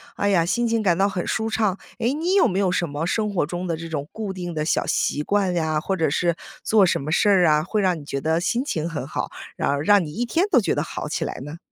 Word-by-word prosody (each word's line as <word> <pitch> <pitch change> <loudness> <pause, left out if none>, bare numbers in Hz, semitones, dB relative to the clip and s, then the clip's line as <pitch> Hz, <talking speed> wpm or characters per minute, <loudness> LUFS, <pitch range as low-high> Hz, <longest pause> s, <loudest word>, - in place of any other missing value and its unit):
哎 205 - 0
呀， 175 -4 +3
心 235 +7 0
情 230 -1 +1
感 180 -5 +2
到 195 +1 +3
很 185 -3 -3
舒 220 0 -1
畅。 210 -4 0 0.2
诶， 240 +4 +1
你 335 +6 0
有 390 - +5
没 190 -3 -2
有 195 -2 +2
什 175 -1 0
么 145 +2 -3
生 210 +3 -1
活 175 - +1
中 175 +3 -4
的 170 - -1
这 165 +1 -7
种 145 -3 -4
固 215 -3 -4
定 180 -2 -5
的 155 -1 -2
小 155 - +1
习 145 - 0
惯 200 0 +1
呀， 160 -3 0
或 190 +3 -2
者 160 - +2
是 170 +3 0 0.3
做 215 -3 +4
什 175 - +1
么 150 +3 -4
事 190 - +3
儿 190 -3 +5
啊， 150 0 +4
会 210 +3 0
让 180 -4 +1
你 145 - -12
觉 140 -1 -3
得 160 +2 +1
心 235 +8 0
情 165 - -2
很 145 -6 -4
好， - - -3 0.3
然 - - 0
后 140 - +1
让 200 +2 +4
你 150 - -8
一 235 - -2
天 335 +9 +1
都 255 - +4
觉 - - 0
得 - - 0
好 - - -5
起 - - -2
来 - - -5
呢？ 145 +3 -8
180 Hz, 305 characters per minute, -23 LUFS, 160-210 Hz, 0.3 s, 有